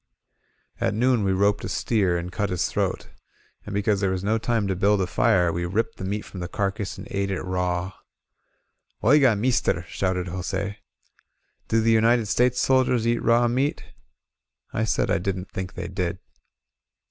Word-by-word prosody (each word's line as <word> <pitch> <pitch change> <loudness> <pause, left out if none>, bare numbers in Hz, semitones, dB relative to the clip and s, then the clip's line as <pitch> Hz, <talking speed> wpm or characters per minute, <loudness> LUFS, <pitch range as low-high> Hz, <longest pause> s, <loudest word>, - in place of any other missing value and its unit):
At - - 0
noon 120 -1 +2
we 95 - +1
roped 100 +2 +2
a - - -4
steer, 95 -7 +1
and 85 +1 -5
cut 100 +3 -2
his 90 -2 0
throat. - - -2 0.6
And 105 - -5
because 100 0 +1
there 95 -1 +1
was 95 0 -2
no 110 +3 +1
time 115 -2 0
to 95 - -1
build 100 +2 +2
a 95 - +1
fire, 90 -1 +2
we 85 +1 -2
ripped 95 +6 -1
the - - -7
meat 100 +3 -2
from 95 - -9
the 90 - -4
carcase 100 +2 -3
and 100 +1 -9
ate 100 0 -1
it 95 - -3
raw. 90 0 -1 1.1
^^OigOy 130 -2 +5
meester," 105 -7 +1
shouted 95 -1 -1
Jose. 95 +3 -3 0.9
"Do 115 - +2
the 115 +1 +3
United 115 +1 +4
States 125 +4 +2
soldiers 125 -3 +2
eat 120 0 +1
raw 120 +1 +3
meat?" 135 +6 0 0.9
I 110 - 0
said 110 - 0
I - - +2
didn't 95 0 -4
think 95 -1 -5
they - - -5
did. 90 -1 -2
100 Hz, 175 wpm, -24 LUFS, 95-115 Hz, 1.1 s, ^^OigOy